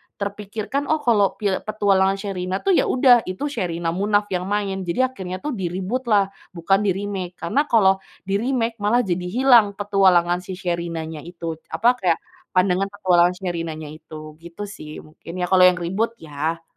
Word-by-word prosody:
terpikirkan, 210 Hz, +7 st, -4 dB
oh, 310 Hz, -1 st, 0 dB
kalau 210 Hz, -5 st, +3 dB
pi 205 Hz, -2 st, -1 dB
Petualangan 195 Hz, -2 st, +2 dB
Sherina, 190 Hz, -2 st, -4 dB
tuh, 390 Hz, -, +2 dB
ya, -, -, +3 dB
udah 250 Hz, -1 st, +5 dB
itu 235 Hz, +11 st, -3 dB
Sherina 170 Hz, -8 st, -2 dB
Munaf 205 Hz, +3 st, 0 dB
yang 180 Hz, 0 st, -2 dB
main, 200 Hz, -1 st, -1 dB
jadi 255 Hz, +9 st, +1 dB
akhirnya, 185 Hz, -2 st, -7 dB
tuh, 300 Hz, -, -2 dB
di-reboot 190 Hz, +4 st, -3 dB
lah, 200 Hz, -3 st, +3 dB, 0.2 s
bukan 195 Hz, +4 st, +2 dB
di-remake, 190 Hz, -2 st, -3 dB
karena 275 Hz, -, 0 dB
kalau 195 Hz, -5 st, +4 dB, 0.2 s
di-remake 230 Hz, +3 st, -1 dB
malah 230 Hz, +4 st, +2 dB
jadi 180 Hz, -2 st, -2 dB
hilang 235 Hz, -2 st, +4 dB
petualangan 190 Hz, -4 st, +3 dB
si 185 Hz, 0 st, -7 dB
Sherina-nya 170 Hz, -3 st, -4 dB
itu. 165 Hz, 0 st, -7 dB
Apa 245 Hz, +3 st, +2 dB
kayak, 175 Hz, -3 st, +2 dB, 0.4 s
pandangan 185 Hz, +1 st, +2 dB
Petualangan 180 Hz, -3 st, +3 dB
Sherinanya 165 Hz, -4 st, -5 dB
itu, 155 Hz, 0 st, -11 dB
gitu, 170 Hz, +4 st, -9 dB
sih. 155 Hz, -7 st, -9 dB
Mungkin, 160 Hz, +2 st, -11 dB
ya, 180 Hz, -1 st, -1 dB
kalau 185 Hz, -1 st, +6 dB
yang 180 Hz, -, +4 dB
reboot, 190 Hz, +7 st, -2 dB
ya. 160 Hz, 0 st, -4 dB
190 Hz, 160 wpm, -22 LUFS, 175-210 Hz, 0.4 s, kalau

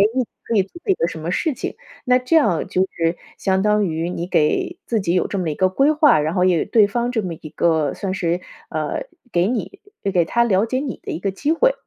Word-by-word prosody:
你 260 Hz, -, +2 dB, 0.2 s
可 230 Hz, -, -1 dB
以 200 Hz, -, +5 dB
做 195 Hz, -, -13 dB
一 390 Hz, -, +4 dB
个 255 Hz, -, 0 dB
什 165 Hz, -, -6 dB
么 165 Hz, +3 st, -3 dB
事 310 Hz, -, 0 dB
情， -, -, -5 dB, 0.3 s
那 250 Hz, -1 st, +4 dB
这 255 Hz, +6 st, 0 dB
样 205 Hz, -, +2 dB
就 185 Hz, -, 0 dB
是 165 Hz, +1 st, 0 dB, 0.2 s
相 190 Hz, -1 st, +1 dB
当 210 Hz, 0 st, +3 dB
于 165 Hz, +1 st, -2 dB
你 175 Hz, -1 st, -4 dB
给 180 Hz, -, +1 dB
自 230 Hz, -, 0 dB
己 175 Hz, -2 st, 0 dB
有 180 Hz, -, +2 dB
这 200 Hz, -, -3 dB
么 175 Hz, -3 st, -1 dB
一 150 Hz, -, -3 dB
个 185 Hz, -, +3 dB
规 275 Hz, +10 st, +3 dB
划， 300 Hz, -, +5 dB
然 155 Hz, +2 st, -1 dB
后 180 Hz, -, +3 dB
也 180 Hz, -3 st, +3 dB
对 220 Hz, -3 st, +5 dB
方 240 Hz, +4 st, -1 dB
这 230 Hz, -3 st, 0 dB
么 180 Hz, -3 st, -3 dB
一 155 Hz, -1 st, -10 dB
个 160 Hz, -3 st, +1 dB
算 190 Hz, -2 st, -3 dB
是 175 Hz, -2 st, 0 dB, 0.3 s
呃， -, -, -2 dB, 0.3 s
给 175 Hz, -1 st, +2 dB
你 250 Hz, -, -3 dB, 0.3 s
给 175 Hz, -3 st, +3 dB
他 235 Hz, +9 st, +2 dB
了 205 Hz, -3 st, +2 dB
解 255 Hz, +3 st, -1 dB
你 270 Hz, -2 st, -4 dB
的 -, -, -6 dB
一 -, -, -4 dB
个 195 Hz, +2 st, -1 dB
机 285 Hz, +11 st, -1 dB
会。 -, -, +3 dB
195 Hz, 270 characters per minute, -21 LUFS, 170-250 Hz, 0.3 s, 以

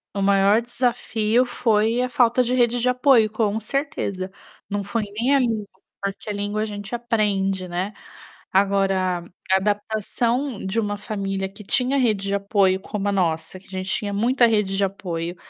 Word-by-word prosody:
O 200 Hz, -, -1 dB
maior 200 Hz, +2 st, +4 dB
desafio 240 Hz, -1 st, +1 dB
foi 225 Hz, -1 st, +1 dB
a 250 Hz, -, -1 dB
falta 245 Hz, -2 st, +3 dB
de 250 Hz, +1 st, 0 dB
rede 240 Hz, -1 st, +2 dB
de 250 Hz, -, +2 dB
apoio, 250 Hz, -3 st, +4 dB
com 215 Hz, -1 st, 0 dB
certeza. 210 Hz, -7 st, -3 dB, 0.4 s
Não 205 Hz, 0 st, -2 dB
foi 220 Hz, +3 st, -2 dB
nem 225 Hz, +7 st, 0 dB
a 275 Hz, -, +4 dB
língua, 225 Hz, -4 st, 0 dB, 0.3 s
porque 200 Hz, +1 st, -4 dB
a -, -, -3 dB
língua 205 Hz, +1 st, -2 dB
a -, -, 0 dB
gente 205 Hz, +1 st, -5 dB
aprende, 200 Hz, -5 st, 0 dB
né. 180 Hz, +4 st, -3 dB, 0.6 s
Agora, 195 Hz, -2 st, +2 dB, 0.3 s
a 190 Hz, -, +6 dB
adaptação 220 Hz, +4 st, -1 dB
de 190 Hz, +4 st, 0 dB
uma 205 Hz, -2 st, -1 dB
família 195 Hz, -2 st, -3 dB
que 200 Hz, +2 st, -12 dB
tinha 255 Hz, +6 st, +2 dB
rede 215 Hz, -6 st, +1 dB
de 200 Hz, -, 0 dB
apoio 200 Hz, -1 st, +2 dB
como 205 Hz, +1 st, -4 dB
a -, -, +1 dB
nossa, 180 Hz, -1 st, -1 dB
que 190 Hz, -, -23 dB
a -, -, -21 dB
gente 185 Hz, 0 st, -4 dB
tinha 205 Hz, -1 st, -1 dB
muita 240 Hz, +4 st, +3 dB
rede 210 Hz, -3 st, +1 dB
de 200 Hz, -, +2 dB
apoio, 175 Hz, -3 st, -3 dB
210 Hz, 180 wpm, -23 LUFS, 195-235 Hz, 0.6 s, a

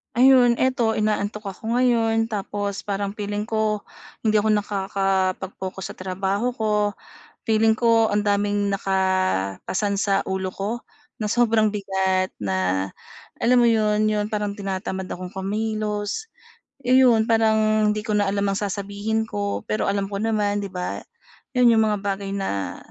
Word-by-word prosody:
Ayun 245 Hz, -1 st, +5 dB
eto 250 Hz, -4 st, +2 dB
inaantok 210 Hz, -1 st, -1 dB
ako 220 Hz, +4 st, -4 dB
ngayon 230 Hz, -2 st, +2 dB
tapos 205 Hz, -1 st, -3 dB
parang 200 Hz, 0 st, -3 dB
feeling 205 Hz, +1 st, -3 dB
ko, 215 Hz, -1 st, 0 dB, 0.4 s
hindi 215 Hz, -1 st, +2 dB
ako 215 Hz, +1 st, +3 dB
nakakapag-focus 195 Hz, -2 st, -1 dB
sa -, -, -10 dB
trabaho 195 Hz, +5 st, -1 dB
ko. 210 Hz, -3 st, 0 dB, 0.6 s
Feeling 220 Hz, 0 st, +4 dB
ko 225 Hz, -1 st, +3 dB
ang 210 Hz, -, +2 dB
daming 205 Hz, 0 st, +1 dB
naka-pasan 190 Hz, -, 0 dB
sa 195 Hz, 0 st, +2 dB
ulo 190 Hz, -1 st, -2 dB
ko 215 Hz, +5 st, -4 dB, 0.3 s
na 215 Hz, -, -3 dB
sobrang 220 Hz, -1 st, +2 dB
bigat 190 Hz, -2 st, 0 dB
na 95 Hz, -1 st, -1 dB, 0.5 s
alam 250 Hz, +1 st, +4 dB
mo 240 Hz, -, +5 dB
'yon, 215 Hz, -2 st, +3 dB
'yon 210 Hz, -1 st, 0 dB
parang 210 Hz, -2 st, -2 dB
tinatamad 190 Hz, -1 st, -4 dB
akong 180 Hz, 0 st, -6 dB
kumilos, 210 Hz, -, -2 dB, 0.6 s
ayon 250 Hz, -3 st, +5 dB
parang 220 Hz, -1 st, +3 dB
hindi 215 Hz, -, -3 dB
ko 215 Hz, -, -1 dB
na 205 Hz, -1 st, +2 dB
alam 200 Hz, 0 st, 0 dB
ang 195 Hz, -, 0 dB
sasabihin 205 Hz, +2 st, -2 dB
ko 205 Hz, -1 st, -3 dB
pero 215 Hz, -2 st, -1 dB
alam 200 Hz, 0 st, 0 dB
ko 200 Hz, 0 st, -3 dB
naman 210 Hz, -2 st, 0 dB
'di 200 Hz, -, -5 dB
ba, 180 Hz, -1 st, -4 dB, 0.6 s
'yon 245 Hz, -2 st, +6 dB
'yong 220 Hz, -, +4 dB
mga 210 Hz, -, 0 dB
bagay 195 Hz, 0 st, -2 dB
na 100 Hz, -, -3 dB
205 Hz, 145 wpm, -23 LUFS, 195-220 Hz, 0.6 s, yon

